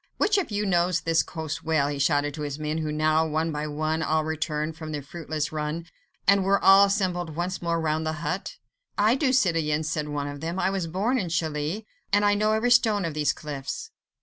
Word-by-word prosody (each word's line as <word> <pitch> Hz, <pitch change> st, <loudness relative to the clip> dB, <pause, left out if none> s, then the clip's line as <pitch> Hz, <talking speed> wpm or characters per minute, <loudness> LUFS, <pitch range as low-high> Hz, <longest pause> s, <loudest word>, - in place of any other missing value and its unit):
"Which 415 Hz, -1 st, +3 dB
of 375 Hz, -, -3 dB
you 210 Hz, 0 st, -1 dB
knows 175 Hz, -2 st, +2 dB
this 165 Hz, 0 st, +2 dB
coast 160 Hz, -2 st, -5 dB
well?" 155 Hz, -3 st, +2 dB
he 145 Hz, -1 st, -3 dB
shouted 145 Hz, 0 st, +2 dB
to 150 Hz, -, -7 dB
his 145 Hz, -1 st, -3 dB
men 155 Hz, +1 st, -2 dB
who 155 Hz, -1 st, -2 dB
now 155 Hz, +1 st, +2 dB
one 160 Hz, +1 st, -1 dB
by 150 Hz, 0 st, -3 dB
one 155 Hz, +2 st, -1 dB
had -, -, -1 dB
all 155 Hz, 0 st, +2 dB
returned 155 Hz, 0 st, -2 dB
from 160 Hz, -1 st, -7 dB
their 145 Hz, -2 st, -4 dB
fruitless 155 Hz, -1 st, -4 dB
run, 155 Hz, +2 st, -3 dB, 0.4 s
and 200 Hz, 0 st, +5 dB
were 195 Hz, +1 st, +3 dB
all 195 Hz, +1 st, +7 dB
assembled 180 Hz, -5 st, -1 dB
once 180 Hz, +3 st, -3 dB
more 170 Hz, -1 st, 0 dB
round 160 Hz, 0 st, -1 dB
the 155 Hz, -, 0 dB
hut. 180 Hz, +6 st, -3 dB, 0.4 s
"I 215 Hz, +3 st, +4 dB
do, 265 Hz, 0 st, +1 dB
citoyen," 165 Hz, -10 st, +2 dB
said 155 Hz, -1 st, -2 dB
one 145 Hz, -1 st, -3 dB
of 145 Hz, 0 st, -7 dB
them, 165 Hz, +3 st, -3 dB
"I 190 Hz, -, +1 dB
was 190 Hz, -4 st, -2 dB
born 205 Hz, +10 st, 0 dB
in 180 Hz, -6 st, -3 dB
Calais, 160 Hz, +5 st, -2 dB, 0.3 s
and 205 Hz, 0 st, +3 dB
know 215 Hz, +1 st, +2 dB
every 230 Hz, +3 st, +1 dB
stone 220 Hz, -6 st, +4 dB
of 165 Hz, -, -3 dB
these 150 Hz, -1 st, +1 dB
cliffs." 145 Hz, -3 st, -6 dB
160 Hz, 220 wpm, -26 LUFS, 150-190 Hz, 0.4 s, all